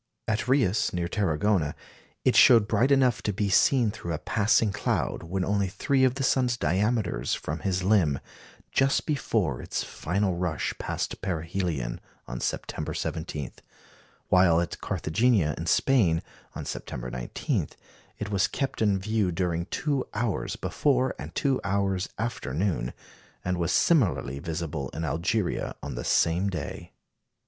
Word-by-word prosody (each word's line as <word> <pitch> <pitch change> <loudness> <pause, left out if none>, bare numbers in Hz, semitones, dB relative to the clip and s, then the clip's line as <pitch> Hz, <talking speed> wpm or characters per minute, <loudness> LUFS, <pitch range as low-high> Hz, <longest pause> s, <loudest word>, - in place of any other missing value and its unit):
At 110 +2 0
Reus, 115 -6 +2
near 90 -1 -1
Tarragona, 85 -3 +1 0.5
it - - +4
showed 115 -4 +7
bright 115 +5 +2
enough 130 -4 +3
to 105 - -1
be 100 +1 -1
seen 115 +3 +4
through 85 -6 -5
a - - -1
passing 110 +3 +2
cloud - - -1
when 90 +2 -2
only 100 -1 +1
three 130 +8 +1
of 130 -1 +3
the 135 - -2
sun's 125 -2 +2
diameters 100 - 0
from 75 +2 -4
his 95 +2 -1
limb, 90 -9 +3 0.5
just 135 0 +2
before 110 - 0
its - - -3
final 95 +3 -1
rush 90 -3 -1
past - - -3
perihelion 85 -7 -2 0.3
on - - -5
September - - -3
17; 80 -4 -4 0.8
while 90 -3 +5
at 85 -2 -3
Carthagena 95 - +1
in 85 - -5
Spain, 90 -7 +3 0.3
on - - -5
September 60 0 -5
19, - - -2 0.5
it 105 0 -5
was 100 0 +2
kept 135 +1 -3
in 105 -3 +3
view 105 -1 0
during 85 0 -1
two 140 +1 -1
hours 110 -2 -1
before 130 -3 +1
and - - -8
two 135 -4 +1
hours 95 -1 0
after 110 - -3
noon, 85 -8 0 0.5
and 90 0 0
was 85 0 0
similarly 100 - +2
visible 80 -3 -4
in 80 - -2
Algeria 85 - -1
on - - -4
the - - -4
same 85 +4 +2
day. 90 - -6
95 Hz, 145 wpm, -27 LUFS, 80-110 Hz, 0.8 s, showed